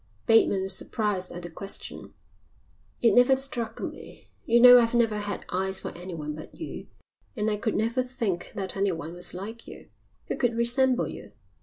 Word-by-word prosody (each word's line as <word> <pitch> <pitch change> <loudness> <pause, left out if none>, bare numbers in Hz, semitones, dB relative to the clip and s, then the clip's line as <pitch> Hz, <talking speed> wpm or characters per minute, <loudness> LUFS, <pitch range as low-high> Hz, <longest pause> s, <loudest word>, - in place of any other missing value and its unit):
Bateman 225 -4 +4
was 190 0 -2
surprised 205 -5 -2
at 175 - -8
the 175 - -6
question. 195 +4 -6 0.9
"It 230 - +5
never 250 +2 +6
struck 240 -4 -2
me. - - -9 0.2
You 235 0 +4
know 245 0 +10
I've 230 0 +1
never 230 -3 +2
had 205 -1 -4
eyes 190 +1 -1
for - - -7
anyone 165 -4 -6
but 155 +1 -10
you 320 - -7 0.5
and 215 -1 0
I 210 - -1
could 215 +1 -2
never 230 +4 +1
think 235 -8 -3
that 190 -1 -4
anyone 170 -5 -2
was 175 0 -1
like 220 +5 -8
you. - - -12 0.4
Who - - -4
could 235 -2 0
resemble 250 +2 +2
you?" - - -10
215 Hz, 175 wpm, -27 LUFS, 190-235 Hz, 0.9 s, know